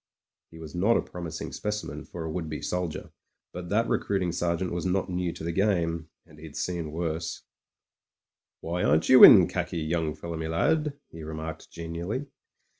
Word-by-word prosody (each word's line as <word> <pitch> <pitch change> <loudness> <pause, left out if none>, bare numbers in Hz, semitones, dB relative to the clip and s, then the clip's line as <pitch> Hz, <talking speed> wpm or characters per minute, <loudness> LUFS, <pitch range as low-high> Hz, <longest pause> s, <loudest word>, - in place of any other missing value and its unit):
He 80 - -13
was 80 -1 -9
not 100 +7 +3
a - - +1
promising 85 -2 -6
specimen 105 0 -4
for 85 - -7
a 80 - -4
would 80 -1 -4
be 75 - -4
soldier, 90 -3 -3 0.4
but 90 -1 -7
that 115 +3 +2
recruiting 95 -3 0
sergeant 85 +1 -1
was 85 0 -3
not 95 0 0
new 90 -1 -1
to - - -9
the 85 - -2
game, 85 -4 0 0.2
and 75 - -17
he'd 80 -2 -10
seen 85 -4 -3
worse. 80 0 -3 1.2
"Why 85 +2 -2
aren't 75 +3 +2
you 130 - +9
in 95 -7 +11
khaki, 85 -1 -3
young 80 -1 -1
fellow 85 -1 -6
me 80 0 -3
lad? 145 - +1
he 80 - -10
remarked 80 0 -6
genially. 85 - -4
85 Hz, 175 wpm, -27 LUFS, 80-90 Hz, 1.2 s, in